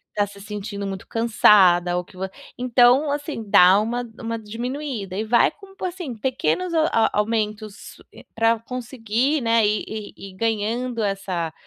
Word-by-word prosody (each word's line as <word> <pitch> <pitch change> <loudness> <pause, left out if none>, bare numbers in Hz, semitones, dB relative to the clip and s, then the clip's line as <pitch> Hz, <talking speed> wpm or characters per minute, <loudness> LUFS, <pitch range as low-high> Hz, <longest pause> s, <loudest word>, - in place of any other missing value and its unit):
tá 205 - +2
se 200 0 -13
sentindo 200 0 -6
muito 195 -1 -6
cansada, 190 -6 +4
ou 180 - -3
que - - -19
vo 190 +1 -4 0.3
então, 250 +3 +4
assim, 290 -4 -4
dá 190 0 +6
uma 240 +2 -3
uma 230 -1 -4
diminuída 230 -2 -5
e 215 - -2
vai 235 +2 +4
com 390 -1 -17
p - - -5
assim, 350 -8 -5
pequenos 265 +9 -1
a 320 -1 +3
a 225 - +3
aumentos, 215 -1 -3 0.2
eh, - - -14
pra 225 0 +2
conseguir, 250 +3 -2
né, 230 -1 +3
ir 210 0 0
ir 215 -1 -7
ir 195 -1 -11
ganhando 230 +3 -1
essa 190 -5 -3
225 Hz, 165 wpm, -22 LUFS, 205-250 Hz, 0.3 s, dá